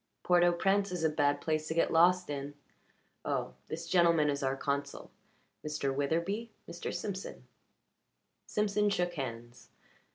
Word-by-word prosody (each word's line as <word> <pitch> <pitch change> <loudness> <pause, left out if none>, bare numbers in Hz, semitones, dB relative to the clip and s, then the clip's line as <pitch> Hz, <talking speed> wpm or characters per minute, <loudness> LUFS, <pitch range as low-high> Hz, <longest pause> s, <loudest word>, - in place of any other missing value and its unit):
Port 175 -1 +4
au 175 - +5
Prince 195 +3 +1
is 180 -2 -3
a 160 - +4
bad 145 -1 +1
place 155 -1 -1
to 160 - -3
get 165 - +2
lost 180 0 +4
in. 140 0 -5 0.7
Oh - - -2
this 165 +1 -5
gentleman 165 -4 +4
is 140 +1 -3
our 135 0 0
consul. 140 0 -3 0.5
Mr. 150 -3 -2
Witherbee 170 +11 -1 0.2
Mr. 170 +1 -5
Simpson." 190 +2 -5 1.0
Simpson 210 0 +1
shook 175 -3 0
hands. 120 -5 -7
165 Hz, 140 wpm, -31 LUFS, 145-180 Hz, 1.0 s, au